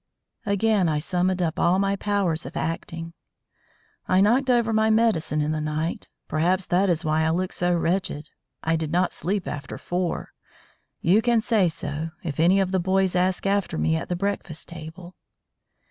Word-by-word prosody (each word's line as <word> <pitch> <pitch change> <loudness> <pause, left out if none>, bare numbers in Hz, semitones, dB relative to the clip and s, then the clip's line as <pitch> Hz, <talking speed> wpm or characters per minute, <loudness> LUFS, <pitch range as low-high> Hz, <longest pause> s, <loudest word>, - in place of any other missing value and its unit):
Again 200 -2 +2
I 155 - +1
summoned 180 +3 0
up 160 -1 -2
all 175 +2 +3
my 195 0 +1
powers 195 -5 -1
of - - -7
acting. 165 0 -4 0.9
"I 185 - +3
knocked 245 +7 +3
over 235 -2 +3
my 220 0 +3
medicine 195 -9 +2
in 150 +1 0
the 155 0 -1
night. 155 +2 -3 0.2
Perhaps 180 +4 +1
that 185 +2 +2
is 170 -1 0
why 155 0 +2
I 160 - +2
look 180 +3 -1
so 175 0 +1
wretched. 170 -3 -1 0.4
I 165 +1 +1
did 160 -1 -3
not 180 +2 +1
sleep 195 +1 -2
after 140 -3 -5
four. 175 -1 -3 0.7
You 190 +6 +4
can 235 -1 +3
say 215 -5 +2
so, 155 0 -4
if 155 -4 -4
any 180 +4 +5
of 190 -1 0
the 190 - +2
boys 190 +1 +1
ask 180 +1 +1
after 200 - 0
me 80 +1 +1
at - - -4
the 180 - 0
breakfast 195 -4 -3
table." 170 +2 -9
180 Hz, 175 wpm, -24 LUFS, 160-195 Hz, 0.9 s, any